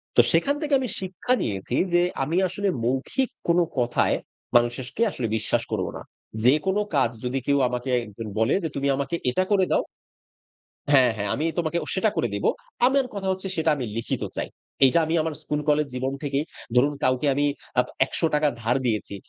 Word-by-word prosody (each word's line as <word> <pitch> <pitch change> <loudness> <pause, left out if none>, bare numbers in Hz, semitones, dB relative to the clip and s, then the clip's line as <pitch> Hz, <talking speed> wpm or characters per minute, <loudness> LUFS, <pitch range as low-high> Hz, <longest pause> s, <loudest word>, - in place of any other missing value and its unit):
তো - - +8
সেখান 285 +1 +2
থেকে 295 -2 -1
আমি 255 - -2
শিক্ষা 190 +6 -2
নিয়েছি 100 +3 -2 0.2
যে, 175 - +5 0.2
আমি 165 +6 -1
আসলে 200 +3 -2 0.2
মৌখিক 135 - 0 0.2
কোনো 175 +1 +4 0.2
কথায়, 120 0 +2 0.4
মানুষকে 120 - +1
আসলে 120 -8 -2
বিশ্বাস - - 0
করব - - 0
না। - - -9 0.4
যেকোনো 155 +10 +3
কাজ 135 -4 +3 0.2
যদি 130 +2 -1
কেউ 140 0 +3
আমাকে 125 +1 -3 0.2
একজন 105 +1 -8
বলে 110 +3 +3
যে, 160 - -1
"তুমি 140 0 -1
আমাকে 140 +4 -2
এটা 185 +9 +1
করে 190 -2 +4
দাও" - - +3 1.1
হ্যাঁ, 130 -4 +6
হ্যাঁ। 105 0 -2
"আমি 155 - -1
তোমাকে 170 0 0
ও - - -9
সেটা 195 +3 +2
করে - - +2
দিব।" 100 - -3 0.4
আমার 270 0 +2
কথা 195 -2 -4
হচ্ছে, 190 +1 -3
সেটা 160 0 +1
আমি 130 -4 -3
লিখিত 115 - -2 0.2
চাই। - - -2 0.4
এইটা 135 +6 +4
আমি 160 - -2
আমার 160 0 -2
স্কুল-কলেজ 150 0 +1
জীবন 130 +1 -2
থেকেই 140 0 0 0.3
ধরুন, 140 +4 +4
কাউকে 130 +3 +2
আমি 145 +2 +1 0.3
আ - - +8 0.2
৳১00 150 +1 +1
ধার 115 +2 +1
দিয়েছি। 110 -3 -1
145 Hz, 180 wpm, -25 LUFS, 125-175 Hz, 1.1 s, তো